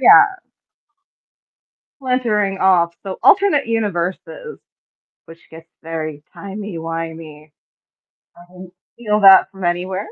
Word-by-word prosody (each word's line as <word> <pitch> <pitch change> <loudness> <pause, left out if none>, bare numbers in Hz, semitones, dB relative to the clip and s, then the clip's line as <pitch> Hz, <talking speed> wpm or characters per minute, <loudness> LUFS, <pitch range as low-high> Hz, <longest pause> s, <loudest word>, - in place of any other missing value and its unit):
yeah. 395 -2 +6 1.6
Splintering 220 -7 -1
off; 175 -3 +2
so, 190 -1 -7
alternate 380 -11 +3
universes, 215 - -4 0.7
which 165 0 -17
gets 160 +1 -14
very 155 -2 -6
timey-wimey. 165 -6 -8 0.9
I 175 +1 -18
didn't 185 0 -13 0.2
steal 210 -3 -2
that 195 -1 +7
from 195 -1 -10
anywhere. 185 +3 -2
185 Hz, 95 wpm, -18 LUFS, 165-210 Hz, 1.6 s, that